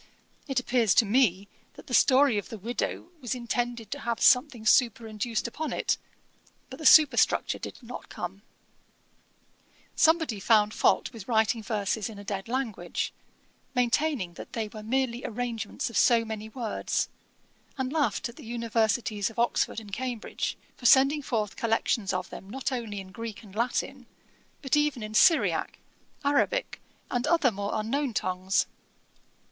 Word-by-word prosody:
It 270 Hz, -2 st, +1 dB
appears 240 Hz, -5 st, +2 dB
to 230 Hz, -, +5 dB
me 205 Hz, -4 st, +2 dB, 0.3 s
that -, -, -13 dB
the 250 Hz, -, -8 dB
story 260 Hz, -2 st, +5 dB
of -, -, -9 dB
the 225 Hz, -, -6 dB
widow 235 Hz, -, -3 dB
was 250 Hz, 0 st, -2 dB
intended 240 Hz, -1 st, -3 dB
to 285 Hz, -, -3 dB
have 235 Hz, -3 st, -2 dB
something 250 Hz, -3 st, +4 dB
superinduced 225 Hz, -1 st, +1 dB
upon 310 Hz, +6 st, -4 dB
it: -, -, 0 dB, 0.8 s
but 260 Hz, -, -8 dB
the 315 Hz, -, +3 dB
superstructure 305 Hz, -3 st, +5 dB
did -, -, -7 dB
not 245 Hz, +1 st, -9 dB
come.' 180 Hz, +3 st, -6 dB, 1.5 s
Somebody 320 Hz, -9 st, +3 dB
found 210 Hz, +1 st, +3 dB
fault -, -, +2 dB
with 220 Hz, -5 st, -10 dB
writing 225 Hz, -1 st, +2 dB
verses 210 Hz, 0 st, -2 dB
in 215 Hz, -, -10 dB
a 200 Hz, -, -9 dB
dead 195 Hz, 0 st, -4 dB
language, 230 Hz, -8 st, -3 dB, 0.6 s
maintaining 250 Hz, -, +1 dB
that -, -, -11 dB
they 220 Hz, -2 st, -3 dB
were 215 Hz, 0 st, -9 dB
merely 245 Hz, +2 st, -1 dB
arrangements 230 Hz, -2 st, -3 dB
of -, -, -11 dB
so 235 Hz, -2 st, +4 dB
many 220 Hz, -1 st, -6 dB
words, 225 Hz, -1 st, -2 dB, 0.7 s
and 260 Hz, +1 st, -2 dB
laughed 280 Hz, -8 st, 0 dB
at 235 Hz, -, -13 dB
the -, -, -11 dB
Universities 225 Hz, -2 st, 0 dB
of 225 Hz, -, -15 dB
Oxford 235 Hz, -1 st, +1 dB
and 205 Hz, -3 st, -13 dB
Cambridge, 245 Hz, -1 st, -3 dB, 0.2 s
for 245 Hz, -, 0 dB
sending 275 Hz, +4 st, +5 dB
forth 220 Hz, -7 st, -2 dB
collections 225 Hz, -2 st, 0 dB
of 185 Hz, -1 st, -2 dB
them 195 Hz, -, -9 dB
not 265 Hz, +4 st, -3 dB
only 225 Hz, -5 st, -4 dB
in 190 Hz, -1 st, -10 dB
Greek 230 Hz, 0 st, -7 dB
and 200 Hz, -3 st, -14 dB
Latin, 245 Hz, +3 st, -2 dB, 0.6 s
but 270 Hz, +1 st, +1 dB
even 295 Hz, -5 st, +1 dB
in 215 Hz, 0 st, -6 dB
Syriac, 315 Hz, -, +3 dB, 0.5 s
Arabick, 290 Hz, -, +1 dB, 0.3 s
and 245 Hz, 0 st, 0 dB
other 325 Hz, -7 st, +3 dB
more 200 Hz, 0 st, -4 dB
unknown 235 Hz, +3 st, -1 dB
tongues. 185 Hz, +1 st, 0 dB
230 Hz, 150 wpm, -28 LUFS, 215-255 Hz, 1.5 s, to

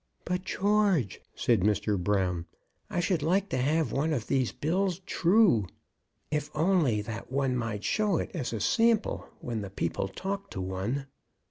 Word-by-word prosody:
"But, 180 Hz, +1 st, -1 dB
George," 195 Hz, -, +1 dB
said 115 Hz, -4 st, +2 dB
Mr. 105 Hz, +2 st, +1 dB
Brown, 90 Hz, -3 st, 0 dB, 0.4 s
"I -, -, -1 dB
should 175 Hz, -2 st, +1 dB
like 185 Hz, +6 st, +1 dB
to -, -, -1 dB
have 145 Hz, 0 st, +1 dB
one 155 Hz, +3 st, +1 dB
of 120 Hz, -7 st, -2 dB
these 130 Hz, -3 st, +1 dB
bills 180 Hz, +3 st, 0 dB
true, 180 Hz, -, +4 dB, 0.6 s
if 150 Hz, -1 st, -1 dB
only 155 Hz, -, +2 dB
that 115 Hz, +2 st, -7 dB
one 135 Hz, -1 st, +1 dB
might 115 Hz, -4 st, -3 dB
show 210 Hz, -5 st, +1 dB
it -, -, -3 dB
as 155 Hz, -9 st, -3 dB
a 115 Hz, -, -3 dB
sample 225 Hz, -, +2 dB
when 115 Hz, -3 st, -3 dB
the 100 Hz, -, -5 dB
people 95 Hz, 0 st, -2 dB
talk 195 Hz, -, -4 dB
to -, -, -6 dB
one." 95 Hz, +9 st, -2 dB
140 Hz, 160 wpm, -29 LUFS, -, 0.6 s, true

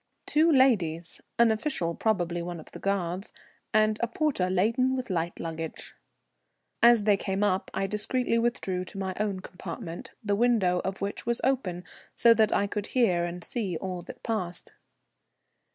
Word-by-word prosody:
Two 320 Hz, +2 st, +4 dB
ladies, 180 Hz, -, +2 dB, 0.2 s
an 235 Hz, -1 st, +5 dB
official, 215 Hz, -, -1 dB
probably 175 Hz, -4 st, 0 dB
one 175 Hz, 0 st, -5 dB
of 155 Hz, -, -13 dB
the -, -, -9 dB
guards, 195 Hz, 0 st, -2 dB, 0.4 s
and 215 Hz, 0 st, +3 dB
a 235 Hz, -, +2 dB
porter 235 Hz, -7 st, 0 dB
laden 230 Hz, +8 st, +2 dB
with 255 Hz, -5 st, -4 dB
light 170 Hz, -1 st, -2 dB
luggage. 165 Hz, -1 st, -6 dB, 0.9 s
As 235 Hz, -2 st, +6 dB
they 205 Hz, -1 st, +4 dB
came 195 Hz, +1 st, -2 dB
up 190 Hz, -2 st, +1 dB
I 195 Hz, -, -1 dB
discreetly 230 Hz, +4 st, 0 dB
withdrew 195 Hz, -6 st, -1 dB
to 195 Hz, -, -10 dB
my 190 Hz, -1 st, -2 dB
own 200 Hz, -3 st, -1 dB
compartment, 180 Hz, -1 st, -7 dB
the 205 Hz, -1 st, 0 dB
window 210 Hz, -6 st, +3 dB
of 190 Hz, 0 st, -4 dB
which 200 Hz, +3 st, -4 dB
was 235 Hz, 0 st, +1 dB
open, 200 Hz, -10 st, 0 dB, 0.3 s
so 235 Hz, -1 st, +6 dB
that 220 Hz, -2 st, +3 dB
I 200 Hz, -, +2 dB
could 205 Hz, 0 st, -3 dB
hear 185 Hz, -9 st, +2 dB
and 175 Hz, 0 st, -6 dB
see 200 Hz, -9 st, -2 dB
all 185 Hz, -1 st, -4 dB
that -, -, -11 dB
passed. 185 Hz, -6 st, -3 dB
200 Hz, 165 wpm, -28 LUFS, 180-230 Hz, 0.9 s, As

